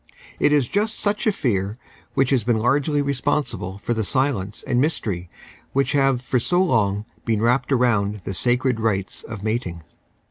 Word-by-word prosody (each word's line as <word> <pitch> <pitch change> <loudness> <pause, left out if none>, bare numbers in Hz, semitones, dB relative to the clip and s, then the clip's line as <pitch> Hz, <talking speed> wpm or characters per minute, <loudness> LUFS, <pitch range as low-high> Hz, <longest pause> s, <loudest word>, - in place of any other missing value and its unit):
It - - +4
is 145 -4 +3
just 215 - 0
such 205 +2 0
a - - +5
fear 105 - -1 0.4
which 135 0 +2
has 130 -5 +3
been 120 0 +2
largely 140 +5 +2
responsible 140 -8 -1
for 110 +4 -2
the 110 -1 -1
silence 115 -5 -1
and 125 0 +1
mystery 100 - -1 0.4
which 140 +1 +1
have 135 -3 +2
for 125 0 +1
so 175 +9 +1
long 105 - +1 0.2
been 110 -3 0
wrapped 125 +4 +1
round 115 -6 +2
the - - -4
s;icred 125 +4 +1
rites 100 -4 -1
of 105 -3 -8
mating. 105 -7 -2
120 Hz, 170 wpm, -22 LUFS, 105-140 Hz, 0.4 s, a